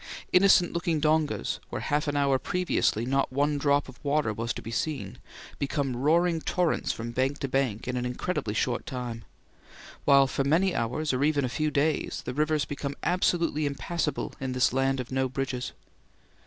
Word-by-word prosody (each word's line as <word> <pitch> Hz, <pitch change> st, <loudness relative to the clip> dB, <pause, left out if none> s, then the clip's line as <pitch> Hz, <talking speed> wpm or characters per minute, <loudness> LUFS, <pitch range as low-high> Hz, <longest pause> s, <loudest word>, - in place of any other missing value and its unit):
Innocent 180 Hz, -1 st, +5 dB
looking 170 Hz, -2 st, 0 dB
dongas, 155 Hz, 0 st, +1 dB
where -, -, -4 dB
half 150 Hz, +1 st, 0 dB
an 145 Hz, 0 st, 0 dB
hour 140 Hz, -2 st, +3 dB
previously 180 Hz, -11 st, 0 dB
not 135 Hz, +1 st, +1 dB
one 145 Hz, +2 st, +1 dB
drop 145 Hz, 0 st, +2 dB
of 130 Hz, -, -14 dB
water 145 Hz, -5 st, +1 dB
was 115 Hz, +2 st, -3 dB
to -, -, -7 dB
be 115 Hz, -, -6 dB
seen, 150 Hz, +4 st, -3 dB, 0.4 s
become 140 Hz, -2 st, -1 dB
roaring 165 Hz, +5 st, +2 dB
torrents 180 Hz, 0 st, 0 dB
from 115 Hz, +1 st, -5 dB
bank 130 Hz, +4 st, 0 dB
to 140 Hz, -, -3 dB
bank 130 Hz, -5 st, -1 dB
in 125 Hz, -, -2 dB
an 125 Hz, -, -1 dB
incredibly 125 Hz, -2 st, -2 dB
short 120 Hz, +2 st, -1 dB
time; 120 Hz, -3 st, -5 dB, 0.8 s
while 140 Hz, -1 st, +6 dB
for 135 Hz, +1 st, -1 dB
many 170 Hz, +7 st, +2 dB
hours 130 Hz, +6 st, -1 dB
or 130 Hz, +2 st, +1 dB
even 145 Hz, -2 st, +2 dB
a -, -, -2 dB
few 155 Hz, +4 st, 0 dB
days 150 Hz, +2 st, 0 dB
the -, -, -3 dB
rivers 150 Hz, +1 st, +1 dB
become 140 Hz, 0 st, -4 dB
absolutely 170 Hz, -4 st, +1 dB
impassable 150 Hz, +3 st, -2 dB
in 130 Hz, -1 st, -3 dB
this 125 Hz, -1 st, +2 dB
land 135 Hz, 0 st, +1 dB
of 125 Hz, 0 st, -5 dB
no 130 Hz, 0 st, 0 dB
bridges. 130 Hz, -1 st, -3 dB
140 Hz, 180 wpm, -27 LUFS, 130-155 Hz, 0.8 s, while